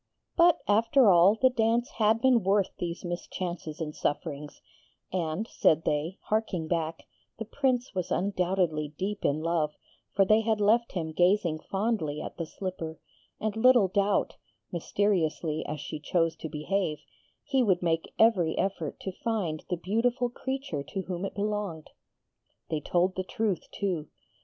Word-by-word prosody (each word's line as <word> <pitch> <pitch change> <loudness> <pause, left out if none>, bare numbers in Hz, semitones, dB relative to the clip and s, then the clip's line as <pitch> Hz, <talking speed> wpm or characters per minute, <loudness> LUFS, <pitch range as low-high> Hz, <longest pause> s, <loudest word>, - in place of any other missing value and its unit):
But, 345 -1 +6
after 225 +2 +5
all, 180 +4 +6
the 260 0 +5
dance 235 +2 +1
had 220 +1 +3
been 255 -2 +5
worth 195 0 +2
these 175 +1 -4
mischances 175 -2 -5
and 150 -2 -4
sufferings; 145 -1 -3 0.5
and, 180 +4 -1
said 160 -7 +2
they, 150 +5 -1
harking 210 -7 -1
back, 165 -1 -2 0.3
the 225 - -5
Prince 255 +1 0
was 185 -2 -2
undoubtedly 180 -5 0
deep 200 +2 -3
in 145 +2 +1
love, 165 -3 0 0.4
for 195 0 +5
they 215 +3 +5
had 220 -1 0
left 225 +3 +3
him 160 -4 -3
gazing 175 -1 +2
fondly 195 -6 -1
at - - -7
the 165 -2 -4
slipper, 165 -3 -5 0.4
and 215 -1 -2
little 235 -3 +5
doubt 200 +1 +1 0.3
mysteriously 170 -4 0
as 150 +1 -4
she 150 +2 -6
chose 165 +1 +1
to 160 - -6
behave 155 +2 -1 0.5
he 270 -2 +1
would 190 -7 +2
make 165 -1 0
every 195 -8 +4
effort 195 0 -2
to 190 - -4
find 185 -7 -2
the 180 - 0
beautiful 235 +7 0
creature 265 - -4
to 190 +7 -5
whom 185 0 -4
it - - -6
belonged. 205 -6 -3 0.8
They 155 - 0
told 175 +5 +1
the 185 - -2
truth, 200 -2 -2
too. 180 -7 -2
185 Hz, 150 wpm, -28 LUFS, 165-215 Hz, 0.8 s, But